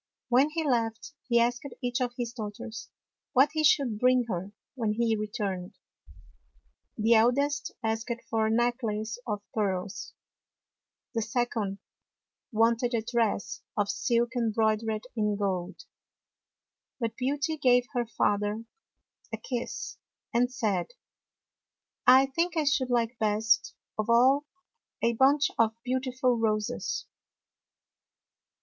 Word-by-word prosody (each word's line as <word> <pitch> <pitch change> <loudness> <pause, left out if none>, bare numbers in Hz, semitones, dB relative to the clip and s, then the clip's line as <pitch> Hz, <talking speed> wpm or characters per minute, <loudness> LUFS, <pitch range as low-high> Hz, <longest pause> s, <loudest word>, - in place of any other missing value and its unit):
When 260 +4 +4
he 315 0 -2
left, 230 +1 -1
he 235 -2 +4
asked 240 +1 +1 0.2
each 245 -1 -2
of 245 -1 -1
his 240 -1 -3
daughters 220 -1 -7 0.4
what 275 +3 +5
he 310 -1 0
should 265 -7 +3
bring 250 0 +4
her 190 0 -3 0.2
when 225 -5 -1
he 225 0 +1
returned. 205 -4 -4 1.2
The 225 +1 +4
eldest 275 +6 +2
asked 225 +2 -1 0.2
for 220 -1 +1
a - - 0
necklace 225 -1 0
of 205 -2 -3
pearls; 195 -2 -2 1.0
the 230 - 0
second 225 -3 -1 0.7
wanted 230 +2 +2
a 225 - 0
dress 230 -4 -1 0.2
of 205 -1 +1
silk 235 0 +1
embroid 220 -2 +2
ered 220 -1 -3
in 210 -2 +1
gold; 190 -2 -2 1.2
but 225 -2 -2
Beauty 285 +5 -1
gave 250 -3 +4
her 240 -2 0
father 210 0 0 0.7
a - - -3
kiss 245 -2 -5 0.4
and 245 +1 +2
said, 215 -8 -1 0.7
" - - -36
I 265 - +5
think 335 +5 -1
I 315 - +3
should 270 -3 +1
like 235 -1 0
best 220 +2 +2 0.2
of 215 +1 -1
all 265 +5 +4 0.6
a 235 - +3
bunch 275 +4 +4
of 225 -1 +3
beautiful 255 -1 0
roses." 215 -2 -1
235 Hz, 125 wpm, -28 LUFS, 215-250 Hz, 1.2 s, what